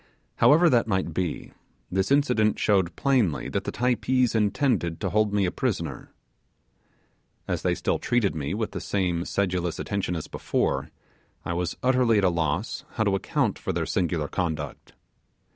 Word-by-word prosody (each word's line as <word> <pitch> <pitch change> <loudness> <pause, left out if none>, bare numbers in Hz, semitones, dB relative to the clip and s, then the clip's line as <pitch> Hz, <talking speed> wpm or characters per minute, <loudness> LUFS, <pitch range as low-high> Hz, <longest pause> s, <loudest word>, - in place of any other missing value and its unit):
However 165 +4 +6
that 120 -7 +3
might 95 -3 -1
be, 90 -3 -3 0.4
this 95 +1 0
incident 125 -7 +3
showed 95 -5 +2
plainly 125 - +1
that - - -2
the - - -2
Typees 125 0 +1
intended 105 - +1
to 95 -4 -2
hold 110 0 +2
me 100 -1 +2
a 90 - 0
prisoner. - - -3 1.4
As - - -1
they - - +1
still - - -1
treated 120 -5 +1
me 75 +3 -3
with 110 0 -2
the - - -5
same 90 -3 -1
sedulous 90 -4 -1
attention 100 -3 -2
as 80 - -4
before, 70 0 -1 0.6
I 85 - -2
was 85 0 -2
utterly 125 -3 +3
at 100 - +2
a 95 - +5
loss 85 - -2
how 110 - 0
to 100 -2 +1
account 95 - 0
for - - -3
their - - -1
singular 85 -4 -1
conduct. 85 -2 -4
100 Hz, 160 wpm, -26 LUFS, 85-115 Hz, 1.4 s, However